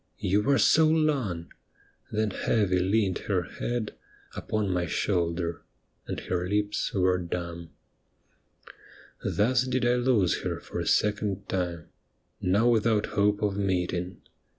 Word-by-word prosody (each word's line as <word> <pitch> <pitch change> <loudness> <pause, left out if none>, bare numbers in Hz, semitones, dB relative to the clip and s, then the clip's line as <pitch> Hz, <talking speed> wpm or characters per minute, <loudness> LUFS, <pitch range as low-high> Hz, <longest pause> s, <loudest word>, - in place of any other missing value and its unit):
You 100 +3 +1
were 140 +5 +3
so 160 +3 +5
long 140 - 0
I - - -28
' - - -37
then 110 -1 +1
heavy 100 -3 +1
leaned 95 0 +1
her 95 -3 +2
head 120 +3 -4 0.4
Upon 105 -3 -2
my 90 -1 0
shoulder, 85 -2 -1 0.5
and - - -3
her 90 0 -2
lips 105 0 0
were 90 -1 +2
dumb. 85 -1 -5 1.5
Thus 115 +3 +2
did 130 -1 0
I 120 +1 +3
lose 120 -8 +2
her - - -3
for - - -6
a - - -3
second 105 -2 +1
time, 90 -3 -3 0.5
Now 100 +6 +3
without 110 -2 +3
hope 105 +1 +2
of 100 -1 0
meeting. 90 -2 -2
100 Hz, 135 wpm, -27 LUFS, 90-110 Hz, 1.5 s, so